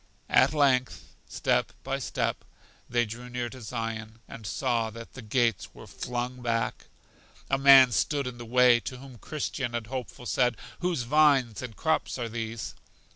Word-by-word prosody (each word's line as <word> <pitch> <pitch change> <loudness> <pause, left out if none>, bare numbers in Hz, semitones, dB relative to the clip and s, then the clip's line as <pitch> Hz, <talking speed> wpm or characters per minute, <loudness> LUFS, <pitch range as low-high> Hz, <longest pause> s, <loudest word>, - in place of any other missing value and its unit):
At - - +5
length, 130 -4 +1
step - - 0
by - - -2
step, - - -2 0.5
they 120 0 +2
drew 120 +3 -8
near 120 -1 -3
to 130 +1 -11
Zion, 110 -1 -5
and 110 -3 -9
saw 120 -1 0
that 115 +1 -10
the 135 - -9
gates 115 -1 0
were - - -11
flung 125 +1 -4
back. 115 -1 -2 0.6
A 135 - +2
man 135 -2 +8
stood 140 +4 0
in 125 -1 -6
the - - -6
way, 125 0 +5
to 130 - -7
whom 130 -2 -12
Christian 135 -4 -3
and 115 -2 -3
Hopeful 125 0 -6
said: 120 +2 +1 0.2
Whose 175 -7 -1
vines 135 -4 +3
and 125 -4 -7
crops 160 -4 0
are 120 -2 -3
these? 115 -1 -5
120 Hz, 165 wpm, -28 LUFS, 115-130 Hz, 0.6 s, man